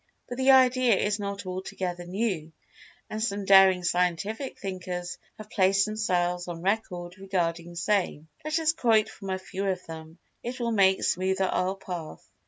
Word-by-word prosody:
But 245 +1 -6
the 260 +1 +3
idea 255 -3 +6
is 205 +2 0
not 200 -1 -4
altogether 185 -1 -4
new, 185 -5 -2 0.6
and 215 0 -3
some 205 -3 -2
daring 190 -2 +6
Scientific 180 - -1
thinkers 180 -2 -5 0.2
have 215 0 -11
placed 195 0 +3
themselves 180 -5 -1
on 170 -1 -6
record 180 -3 -2
regarding 175 -3 -2
same. 175 -4 0 0.2
Let 310 +1 0
us 320 0 +2
quote 225 -8 +3
from 195 -2 -9
a 190 - 0
few 190 +1 -5
of 185 -1 -2
them—it 165 +10 -9
will 235 -1 -1
make 190 -3 +3
smoother 190 +1 +1
our 185 +1 0
path. 180 -4 -7
190 Hz, 155 wpm, -27 LUFS, 180-215 Hz, 0.6 s, idea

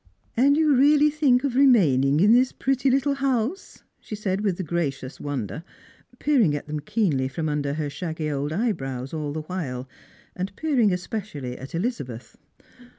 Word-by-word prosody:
" - - -44
And 280 +5 +4
you 310 -2 +4
really 295 +3 +5
think 280 -4 +3
of 270 -3 -1
remaining 155 - +4
in 210 +4 +6
this 250 +1 +4
pretty 270 0 0
little 275 +2 +2
house," 275 - -2 0.2
she 215 - -7
said 200 -2 -2
with 195 -4 -1
a - - -1
gracious 145 -6 -3
wonder, 140 - -4 0.5
peering 245 - +2
at 145 - -5
them 150 0 -4
keenly 150 - 0
from 155 +4 -3
under 145 -1 -1
her 155 -1 -2
shaggy 160 0 -4
old 145 +1 -2
eyebrows 135 - -2
all 150 -2 -3
the 155 +1 -4
while, 140 -8 -5 0.5
and 190 +2 -4
peering 260 -9 +2
especially 180 - -4
at 135 +5 -8
Elizabeth. 140 - -4
180 Hz, 165 wpm, -24 LUFS, -, 0.5 s, in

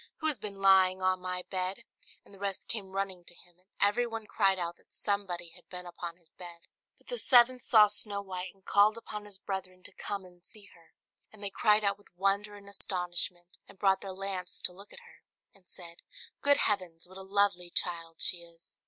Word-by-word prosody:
"Who 315 - -7
has 300 -7 +1
been 205 -1 -5
lying 190 -1 +5
on 185 0 +2
my 180 0 -3
bed?" 185 0 -2 0.4
And - - -17
the 195 - -14
rest 200 -1 -4
came 205 -4 0
running 195 -2 -2
to 175 - -9
him, 175 0 -18
and 185 +2 -32
every 220 +4 +3
one 225 -1 -6
cried 195 -2 +2
out 175 -1 -4
that - - -30
somebody 185 -4 -2
had 175 +1 -16
been 180 -1 -6
upon 175 -1 -7
his 170 -3 -26
bed. 175 -2 -10 0.4
But - - -30
the - - -2
seventh 250 0 +5
saw 215 -3 +7
Snow 205 0 +1
White, 185 -1 -5
and 195 - -30
called 210 +2 +4
upon 210 -2 -7
his 205 -2 -8
brethren 185 -2 -6
to - - -5
come 200 -2 -5
and 180 -1 -18
see 210 +1 -12
her; 165 -1 -23 0.4
and 215 -1 -14
they 200 - -2
cried 210 +1 +3
out 200 0 +1
with 205 - -22
wonder 200 +3 0
and 200 -1 -13
astonishment, 180 -2 0
and 200 - -16
brought 195 -1 +3
their 195 - -6
lamps 190 -1 -3
to 180 - +1
look 200 +3 -13
at - - -12
her, 470 - -18 0.3
and 190 -2 -17
said, 170 -1 -8 0.4
"Good 285 0 +5
heavens! 180 -8 0
What 185 +1 -12
a - - -7
lovely 190 -2 +1
child 165 -2 -1
she 180 - +4
is!" 170 -1 -15
190 Hz, 215 wpm, -31 LUFS, 180-205 Hz, 0.4 s, saw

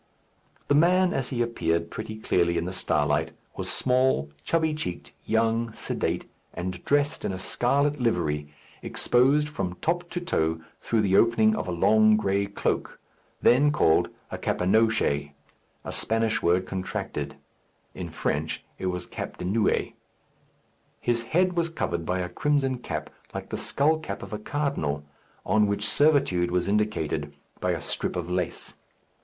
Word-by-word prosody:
The - - +3
man, 180 +4 +4
as 135 -2 -1
he 120 -3 0
appeared 85 -8 -1
pretty 110 0 -5
clearly 85 -5 +1
in 85 - -1
the 90 - -4
starlight, 75 -5 +1 0.2
was - - -3
small, 125 - +2
chubby 160 - +1
cheeked, 120 - -5
young, 115 +1 +1
sedate, - - -2 0.3
and 90 0 -4
dressed 145 +1 +2
in - - -1
a 95 - -4
scarlet 140 +9 +1
livery, 75 -11 0 0.3
exposed 140 +5 +2
from 95 -12 -3
top 175 - -1
to 175 - -3
toe 80 - 0 0.2
through 115 -2 +1
the 95 -2 +2
opening 110 -1 +4
of - - -3
a - - -2
long 110 +5 +5
gray 100 -1 +1
cloak, - - -2 0.4
then 145 +4 +5
called 80 - +3 0.2
a - - -4
capenoche, 90 -8 +1 0.5
a - - -4
Spanish 115 0 +1
word 90 +2 +2
contracted; 95 0 -4 0.6
in - - -6
French 80 +2 -2 0.2
it 95 - -2
was 90 -1 -2
cape - - -6
de 90 - -5
nuit. 105 +4 +1 1.1
His 120 -1 0
head 180 +8 +2
was 170 -1 0
covered 85 - -3
by 90 +1 0
a 90 - -3
crimson 135 +3 0
cap, - - -5 0.2
like - - -5
the - - -1
skull 155 +3 +2
cap 155 - -6
of - - -8
a 105 - -3
cardinal, 105 - -2 0.4
on 105 -1 +3
which 100 +1 -1
servitude 140 - +3
was 90 0 0
indicated 80 -9 -1 0.2
by - - -1
a - - 0
strip - - -3
of 90 -1 -3
lace. 90 -1 -2
110 Hz, 155 wpm, -26 LUFS, 90-140 Hz, 1.1 s, long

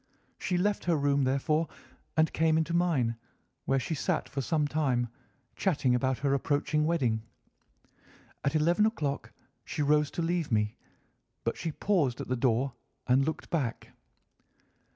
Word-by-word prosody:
She 180 - 0
left 205 +3 0
her 175 -1 +3
room, 140 -2 +2
therefore, 150 +5 +1 0.5
and 160 0 +3
came 160 0 +3
into 160 +1 0
mine, 150 -10 +2 0.5
where 135 - +2
she 145 - -3
sat 150 - -1
for 135 - -3
some 150 +3 +1
time, 130 -6 0 0.5
chatting 140 -9 +1
about 130 +1 +1
her 140 +2 +1
approaching 145 +2 +1
wedding. 125 -10 +1 1.2
At 140 - 0
eleven 175 +7 +4
o'clock 145 -11 -3 0.3
she 150 - -2
rose 150 0 +3
to 170 - +1
leave 170 -3 -1
me, 105 0 +1 0.7
but - - 0
she 165 - -3
paused 150 -8 +1
at - - -5
the 130 - +1
door 125 +1 +1 0.3
and 130 +2 +4
looked 160 +3 -4
back. 140 -9 -2
145 Hz, 150 wpm, -30 LUFS, 130-165 Hz, 1.2 s, eleven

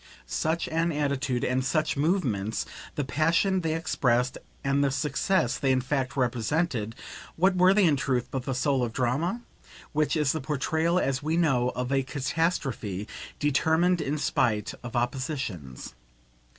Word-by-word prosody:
Such 160 - -1
an 165 +1 +1
attitude 140 -4 -1
and 130 +1 +1
such 155 +4 0
movements, 135 - 0 0.3
the 145 - -1
passion 165 +7 +2
they 160 -1 -1
expressed 125 -6 +1 0.3
and 135 +1 +2
the 140 - +3
success 150 +1 0
they 135 - +2
in 130 - +3
fact 130 +1 -2
represented, 125 -1 0 0.4
what 185 +3 +3
were 180 +1 +6
they 200 0 +4
in 150 -4 +4
truth 130 -3 0
but 130 -2 -3
the 135 - -2
soul 135 0 +1
of 115 -2 -2
drama? 140 - 0 0.5
which 155 0 +1
is 150 -3 +2
the 160 - -2
portrayal, 160 +4 0
as 135 -4 0
we 155 +3 0
know, 135 -8 +2
of 125 +1 -2
a 135 -1 +3
catastrophe 130 - -2 0.3
determined 160 +5 +2
in 150 +1 -1
spite 120 -8 0
of 120 -1 -7
oppositions. 120 - -3
140 Hz, 150 wpm, -27 LUFS, 125-160 Hz, 0.5 s, were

